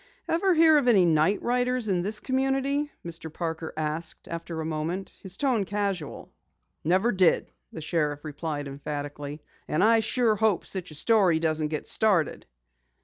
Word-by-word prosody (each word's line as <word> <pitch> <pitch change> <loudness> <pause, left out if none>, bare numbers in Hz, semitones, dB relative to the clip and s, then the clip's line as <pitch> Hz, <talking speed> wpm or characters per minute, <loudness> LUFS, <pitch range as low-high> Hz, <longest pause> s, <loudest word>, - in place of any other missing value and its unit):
"Ever 355 +2 +2
hear 320 -1 +6
of 260 - -2
any 200 -7 +6
night 165 +4 +2
riders 250 -1 0
in 185 -3 +1
this 210 +4 -1
community?" 270 +4 0
Mr. 165 -1 -7
Parker 160 0 -4
asked 155 +1 -4
after 165 0 -5
a 160 - -3
moment, 160 +4 -3
his 190 -1 -7
tone 255 -7 +1
casual. 195 -6 -3 0.5
"Never 185 +9 +2
did," 185 -5 +2 0.2
the 160 - -7
sheriff 150 -2 -1
replied 150 -1 -4
emphatically. 145 +1 -6 0.2
"And 155 - +1
I 225 +1 +5
sure 225 0 +2
hope 215 -3 +1
such 185 -2 -5
a 155 - -10
story 190 -1 +4
doesn't 155 -1 0
get 155 0 -4
started." 195 -8 +1
180 Hz, 155 wpm, -27 LUFS, 155-225 Hz, 0.5 s, hear